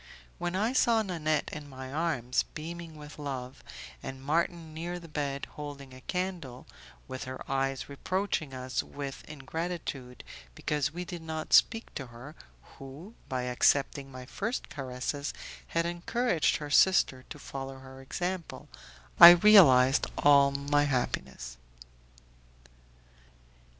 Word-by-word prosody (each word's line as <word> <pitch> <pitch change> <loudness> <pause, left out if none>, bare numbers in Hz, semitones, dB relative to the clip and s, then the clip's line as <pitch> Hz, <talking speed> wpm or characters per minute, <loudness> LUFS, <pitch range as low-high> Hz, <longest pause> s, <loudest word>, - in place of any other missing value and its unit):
When 175 +1 -2
I 220 +6 +1
saw 230 -3 +3
Nanette 155 -6 -1
in 150 -2 -7
my 130 0 -8
arms, 145 -6 0
beaming 165 +1 -7
with 150 0 -11
love, 135 -2 -6 0.4
and 135 0 -7
Marton 165 +2 -1
near 170 +3 -4
the 170 -1 -11
bed, 140 -3 -3
holding 140 -3 -8
a 130 - -12
candle, 175 -8 -4 0.4
with 130 -1 -6
her 130 0 -7
eyes 135 -1 -1
reproaching 160 +1 -2
us 130 0 -3
with 140 -1 -7
ingratitude 150 -3 -5 0.3
because 150 -1 -1
we 175 +2 -5
did 175 -1 -7
not 160 -1 -5
speak 225 0 +4
to 135 - -6
her, 120 +5 -11 0.5
who, 140 +10 -10 0.2
by 130 -1 -2
accepting 135 +2 +1
my 130 -1 -9
first 220 - -4
caresses, 135 +2 -4 0.3
had 165 0 0
encouraged 175 +2 0
her 150 -1 -7
sister 140 -7 +4
to - - -8
follow 135 0 -7
her 130 0 -12
example, 175 +6 -5 0.5
I 170 - +14
realized 170 -9 +7
all 140 -1 +6
my 145 +1 +1
happiness. 65 - -3
145 Hz, 130 wpm, -29 LUFS, 130-170 Hz, 0.5 s, I